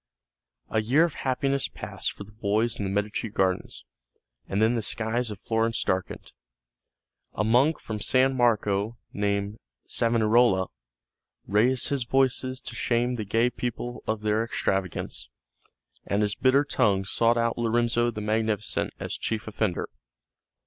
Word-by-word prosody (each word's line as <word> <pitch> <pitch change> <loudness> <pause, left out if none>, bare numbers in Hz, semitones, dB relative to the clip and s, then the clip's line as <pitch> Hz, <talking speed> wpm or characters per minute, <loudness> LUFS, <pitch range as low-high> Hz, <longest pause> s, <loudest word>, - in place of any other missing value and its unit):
A 110 - +2
year 130 +9 +4
of 170 -3 0
happiness 135 +1 0
passed - - -4
for - - -9
the 105 - -15
boys 105 +2 0
in 100 - -1
the - - -2
Medici 105 +3 -1
gardens, 95 -2 -1 0.6
and 100 - -1
then 110 +2 +4
the 115 - 0
skies 115 +3 -1
of 105 -3 -7
Florence 115 0 0
darkened. 95 0 -2 1.0
A 105 - -1
monk 125 +8 +3
from 110 -1 -5
San 130 +4 +3
Marco 110 -2 +1 0.2
named 100 +1 -1 0.3
Savonarola 115 -4 +3 0.8
raised 120 +5 +2
his 140 -3 0
voice 135 +1 +3
to 130 -2 -6
shame 120 +1 +1
the 115 -3 -3
gay 115 +4 +2
people 120 0 -4
of 110 -1 -1
their 105 +1 +1
extravagance, 95 - -2 0.8
and 100 +1 +1
his 105 -1 0
bitter 135 +2 +3
tongue 100 -8 +2
sought 115 +4 +2
out 115 0 0
Lorenzo 120 0 +2
the 110 -2 -5
Magnificent 110 0 -1
as - - -4
chief 110 -1 -3
offender. 110 -4 -1
115 Hz, 140 wpm, -26 LUFS, 105-120 Hz, 1.0 s, year